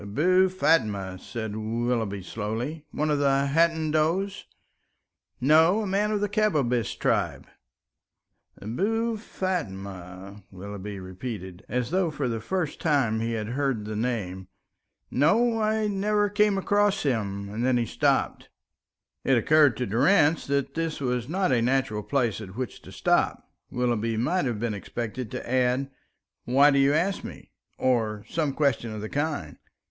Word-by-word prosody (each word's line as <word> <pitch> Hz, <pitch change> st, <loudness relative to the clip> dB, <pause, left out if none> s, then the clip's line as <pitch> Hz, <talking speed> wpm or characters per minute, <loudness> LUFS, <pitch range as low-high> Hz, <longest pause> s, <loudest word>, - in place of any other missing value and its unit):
"Abou 180 Hz, -, +3 dB
Fatma," 105 Hz, -, +1 dB
said 110 Hz, 0 st, -5 dB
Willoughby, 110 Hz, -2 st, -2 dB
slowly, 115 Hz, -, -4 dB
"one 150 Hz, +1 st, -1 dB
of 145 Hz, -, +1 dB
the 140 Hz, -1 st, +3 dB
Hadendoas?" 165 Hz, +3 st, +1 dB, 0.9 s
"No, 160 Hz, -, +4 dB
a -, -, -3 dB
man 200 Hz, +2 st, +1 dB
of 210 Hz, -1 st, 0 dB
the 205 Hz, -, +1 dB
Kabbabish 150 Hz, -, 0 dB
tribe." -, -, 0 dB, 1.1 s
"Abou 220 Hz, -, -1 dB
Fatma?" 100 Hz, -, -5 dB
Willoughby 100 Hz, +1 st, -7 dB
repeated, 95 Hz, -1 st, -7 dB
as 125 Hz, +2 st, -1 dB
though 185 Hz, -1 st, +2 dB
for 145 Hz, -3 st, -2 dB
the 115 Hz, -2 st, -2 dB
first 180 Hz, -, -2 dB
time 135 Hz, -9 st, +2 dB
he 115 Hz, +1 st, -1 dB
had 110 Hz, -1 st, -3 dB
heard 130 Hz, -4 st, -1 dB
the 105 Hz, 0 st, -5 dB
name. 105 Hz, -5 st, -3 dB, 0.6 s
"No, 225 Hz, -, +3 dB
I 215 Hz, 0 st, +1 dB
never 205 Hz, +1 st, +1 dB
came 210 Hz, -1 st, +2 dB
across 205 Hz, 0 st, +2 dB
him;" 100 Hz, -7 st, -1 dB
and 110 Hz, +4 st, -3 dB
then 130 Hz, -1 st, +3 dB
he 120 Hz, -, +1 dB
stopped. -, -, 0 dB, 0.7 s
It 135 Hz, -2 st, +3 dB
occurred 145 Hz, 0 st, +4 dB
to 125 Hz, -, -1 dB
Durrance 145 Hz, -, +3 dB
that 140 Hz, -1 st, -1 dB
it 165 Hz, -1 st, -2 dB
was 125 Hz, -2 st, -2 dB
not 185 Hz, -2 st, +1 dB
a 120 Hz, -2 st, +3 dB
natural 125 Hz, -3 st, +1 dB
place 120 Hz, -3 st, 0 dB
at 95 Hz, -2 st, -9 dB
which 125 Hz, -2 st, -5 dB
to -, -, -13 dB
stop; -, -, 0 dB, 0.2 s
Willoughby 115 Hz, -2 st, 0 dB
might 160 Hz, +9 st, +1 dB
have 120 Hz, -5 st, -2 dB
been 115 Hz, -1 st, -1 dB
expected 115 Hz, +3 st, -5 dB
to -, -, -6 dB
add, 130 Hz, +2 st, +1 dB, 0.5 s
"Why 140 Hz, +4 st, +5 dB
do 140 Hz, -, +3 dB
you 135 Hz, +1 st, +4 dB
ask 185 Hz, +5 st, 0 dB
me?" -, -, -10 dB, 0.3 s
or 110 Hz, -5 st, 0 dB
some 155 Hz, -4 st, -1 dB
question 135 Hz, -6 st, 0 dB
of 105 Hz, -, -6 dB
the 110 Hz, -, -4 dB
kind. 145 Hz, -, -3 dB
130 Hz, 150 wpm, -26 LUFS, 110-165 Hz, 1.1 s, Why